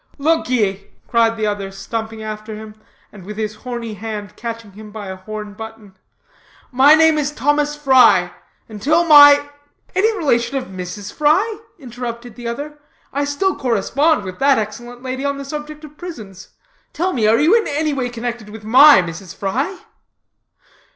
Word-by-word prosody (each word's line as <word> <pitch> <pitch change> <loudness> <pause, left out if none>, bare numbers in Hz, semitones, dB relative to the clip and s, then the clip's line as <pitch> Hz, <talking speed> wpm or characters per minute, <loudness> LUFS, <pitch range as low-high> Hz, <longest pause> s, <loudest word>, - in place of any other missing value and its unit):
"Look 320 0 +1
ye," 200 -6 0 0.2
cried 230 -1 +2
the 215 - -1
other, 205 -2 -2
stumping 220 +3 -6
after 215 0 -6
him, 215 0 -10 0.4
and 200 -3 -13
with 210 +3 -8
his 215 -1 -4
horny 235 -2 -6
hand 210 0 -7
catching 230 -2 -7
him 210 +2 -12
by 205 -2 -8
a 190 - -5
horn 210 +2 -8
button, 220 -2 -11 0.8
"my 270 +4 +6
name 320 -1 +4
is 290 -1 -1
Thomas 295 +2 0
Fry. 265 -4 +4 0.3
Until 280 +11 +1
my 290 -2 +8 0.2
" - - -37
"Any 430 +3 +2
relation 270 -3 0
of 265 - -2
Mrs. 185 +2 -7
Fry?" 380 +9 +1 0.2
interrupted 240 -3 -7
the 240 +1 -8
other. 290 +5 -6 0.3
"I 285 +1 0
still 330 +7 0
correspond 260 +4 +1
with 185 -1 -8
that 275 -1 +4
excellent 240 +3 -6
lady 260 +1 -4
on 280 0 -1
the 280 - -7
subject 300 +1 -7
of 300 0 -13
prisons. 210 - -9 0.4
Tell 360 +3 -1
me, 220 -4 +1
are 220 +1 +4
you 315 - +4
anyway 285 -4 -1
connected 240 -2 -6
with 215 0 -10
my 260 0 +7
Mrs. 170 +2 -8
Fry?" 275 - -3
240 Hz, 165 wpm, -19 LUFS, 215-290 Hz, 0.8 s, my